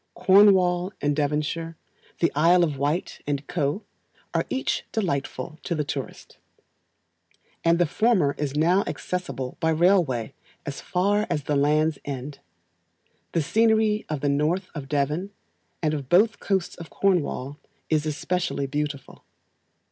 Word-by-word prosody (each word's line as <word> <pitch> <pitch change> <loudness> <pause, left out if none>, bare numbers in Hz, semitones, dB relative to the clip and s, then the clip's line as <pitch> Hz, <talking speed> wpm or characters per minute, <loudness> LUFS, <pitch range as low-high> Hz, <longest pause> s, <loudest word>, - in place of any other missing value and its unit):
Cornwall 185 -1 +5
and 145 0 0
Devonshire, 150 +2 -2 0.4
the 170 - +3
Isle 170 +4 +5
of 155 -4 0
Wight, 150 +6 -1
&c., 145 - +1 1.0
are - - 0
each 265 - -1
delightful 155 - -3
to 170 - -2
the 150 - 0
tourist; 135 -1 -7 1.2
and 170 0 +4
the 175 - +3
former 180 -4 +2
is 145 -2 -2
now 175 +6 +3
accessible 175 -8 -4
by 160 - +1
railway 160 - +2 0.3
as 145 -3 -5
far 205 +4 +1
as 150 - -1
the 145 - -1
Land's 150 +2 +2
End. 140 0 -6 0.9
The 165 - +1
scenery 220 +2 +2
of 150 -3 -3
the 145 - +1
North 155 +7 0
of 145 -4 -6
Devon, 150 +6 0 0.5
and 155 -1 +1
of 140 -4 -4
both 215 +6 +4
coasts 190 -4 -1
of 165 -2 -10
Cornwall, 150 -7 0 0.3
is 155 -1 +1
especially 165 -1 -1
beautiful. 145 0 -4
160 Hz, 135 wpm, -25 LUFS, 145-180 Hz, 1.2 s, Cornwall